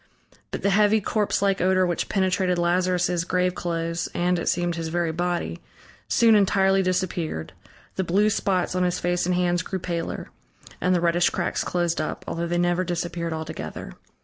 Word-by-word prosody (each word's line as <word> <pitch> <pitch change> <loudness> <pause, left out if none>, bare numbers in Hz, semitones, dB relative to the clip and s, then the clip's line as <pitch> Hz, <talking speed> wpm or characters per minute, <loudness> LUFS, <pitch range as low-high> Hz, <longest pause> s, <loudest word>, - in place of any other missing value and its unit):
But - - -5
the 200 - +3
heavy 210 +2 +4
corpse 210 0 0
like 195 -1 +2
odor 185 0 +3
which 175 -1 -2
penetrated 185 -2 +1
Lazarus' 175 0 +1
graveclothes 175 -2 -1
and, 175 0 +1
it - - -1
seemed, 175 0 0
his 165 -1 -3
very 170 0 0
body, 170 - -2 0.5
soon 230 -1 +4
entirely 195 -1 +4
disappeared, 180 - -2 0.4
the 190 - +1
blue 200 +5 +2
spots 185 -4 0
on 185 - 0
his 180 -1 +1
face 175 0 0
and 180 - +1
hands 175 -1 +1
grew 190 +1 -4
paler, 170 -2 -4 0.5
and 180 +2 +2
the 175 - +1
reddish 170 0 +3
cracks - - -2
closed 175 -2 0
up, 155 - -4
although 170 +1 -2
they 175 +1 -1
never 175 +1 +1
disappeared 170 -1 -3
altogether. 160 - -6
175 Hz, 170 wpm, -24 LUFS, 170-185 Hz, 0.5 s, heavy